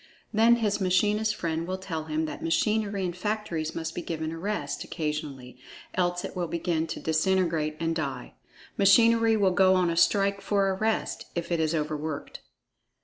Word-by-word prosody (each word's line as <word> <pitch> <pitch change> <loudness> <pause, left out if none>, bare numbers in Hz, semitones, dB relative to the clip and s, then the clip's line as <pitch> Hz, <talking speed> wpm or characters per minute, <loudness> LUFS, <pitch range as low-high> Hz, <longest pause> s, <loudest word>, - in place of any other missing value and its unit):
Then 225 +2 +5
his 210 -3 0
machinist 210 +4 +2
friend 165 0 -2
will 185 +1 -2
tell 165 -5 -5
him 155 0 -1
that 155 - -6
machinery 205 +3 0
in 175 - -2
factories 180 -5 -3
must 165 0 -4
be - - -4
given 160 -2 -4
a 165 - -6
rest, 185 -7 -3
occasionally, 150 -6 -5 0.3
else 175 -1 0
it - - -7
will 175 -1 -2
begin 165 -1 -1
to - - -5
disintegrate 160 -2 +1
and 165 0 -1
"die." 135 -5 -4 0.5
Machinery 225 +3 +5
will 195 -3 +3
go 190 0 +5
on 180 -2 +2
a - - -2
strike 200 +3 +3
for 195 -1 +1
a - - +1
rest, 220 +3 -2
if 170 0 -3
it 170 - +1
is 160 0 +1
overworked. 155 -1 -4
175 Hz, 175 wpm, -27 LUFS, 160-200 Hz, 0.5 s, Then